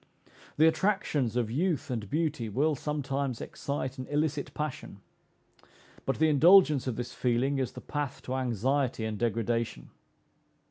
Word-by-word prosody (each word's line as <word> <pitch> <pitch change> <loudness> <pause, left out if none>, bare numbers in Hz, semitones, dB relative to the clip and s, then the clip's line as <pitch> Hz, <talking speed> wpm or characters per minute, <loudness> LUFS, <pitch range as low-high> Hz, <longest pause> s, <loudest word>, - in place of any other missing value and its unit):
The 155 - +6
attractions 160 - +1
of 120 -3 0
youth 155 0 0
and 110 -5 -3
beauty 150 -7 -1
will 145 +9 +1
sometimes 140 -3 -2
excite 135 -2 -4
an 130 - -5
illicit 150 -1 -1
passion, 150 -9 -5 1.1
but 135 - 0
the 160 - +4
indulgence 155 -2 +6
of 125 - -1
this 120 +1 -5
feeling 130 +3 +1
is 130 - -2
the - - -8
path 145 -3 -4
to 130 - -4
anxiety 130 0 0
and 110 -1 -3
degradation. 115 - -1
135 Hz, 140 wpm, -29 LUFS, 120-150 Hz, 1.1 s, The